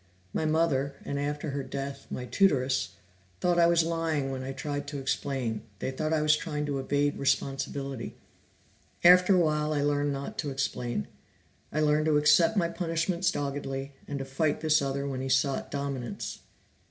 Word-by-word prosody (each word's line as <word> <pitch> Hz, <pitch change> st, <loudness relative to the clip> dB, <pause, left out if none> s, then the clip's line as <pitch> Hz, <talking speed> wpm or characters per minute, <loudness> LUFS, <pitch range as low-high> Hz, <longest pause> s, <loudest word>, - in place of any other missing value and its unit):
My 160 Hz, -, 0 dB
mother, 145 Hz, -3 st, +1 dB
and 140 Hz, -, -2 dB
after 145 Hz, +1 st, -2 dB
her 140 Hz, 0 st, -2 dB
death, 135 Hz, +1 st, -6 dB
my 125 Hz, -, -4 dB
tutoress, 135 Hz, -6 st, +2 dB, 0.4 s
thought 175 Hz, -1 st, +2 dB
I 170 Hz, -, +6 dB
was 170 Hz, -1 st, +4 dB
lying 160 Hz, -4 st, -1 dB
when 130 Hz, -1 st, -4 dB
I 130 Hz, +1 st, -4 dB
tried 145 Hz, +1 st, -4 dB
to 145 Hz, 0 st, -4 dB
explain; 130 Hz, -4 st, -2 dB, 0.2 s
they 130 Hz, -, -3 dB
thought 155 Hz, +4 st, -2 dB
I 155 Hz, -1 st, +2 dB
was 150 Hz, 0 st, +5 dB
trying 150 Hz, -1 st, -3 dB
to 140 Hz, -2 st, -2 dB
evade 145 Hz, +2 st, 0 dB
responsibility. 135 Hz, -1 st, -1 dB, 0.9 s
After 180 Hz, +2 st, +7 dB
a -, -, +5 dB
while 155 Hz, -2 st, +1 dB
I 145 Hz, -1 st, +1 dB
learned 145 Hz, 0 st, +1 dB
not 140 Hz, 0 st, -5 dB
to 150 Hz, -, -1 dB
explain; 125 Hz, -, -2 dB, 0.6 s
I 155 Hz, -, 0 dB
learned 150 Hz, +1 st, +3 dB
to 150 Hz, -1 st, +4 dB
accept 165 Hz, +7 st, +5 dB
my 170 Hz, -3 st, +3 dB
punishments 170 Hz, +1 st, 0 dB
doggedly, 140 Hz, -1 st, -3 dB
and 145 Hz, -, -3 dB
to 135 Hz, -, -4 dB
fight 145 Hz, +3 st, 0 dB
this 155 Hz, -1 st, +3 dB
other 140 Hz, 0 st, -2 dB
when 130 Hz, -2 st, -3 dB
he 135 Hz, -, -3 dB
sought 130 Hz, +1 st, +1 dB
dominance." 140 Hz, -4 st, -4 dB
145 Hz, 175 wpm, -29 LUFS, 135-155 Hz, 0.9 s, After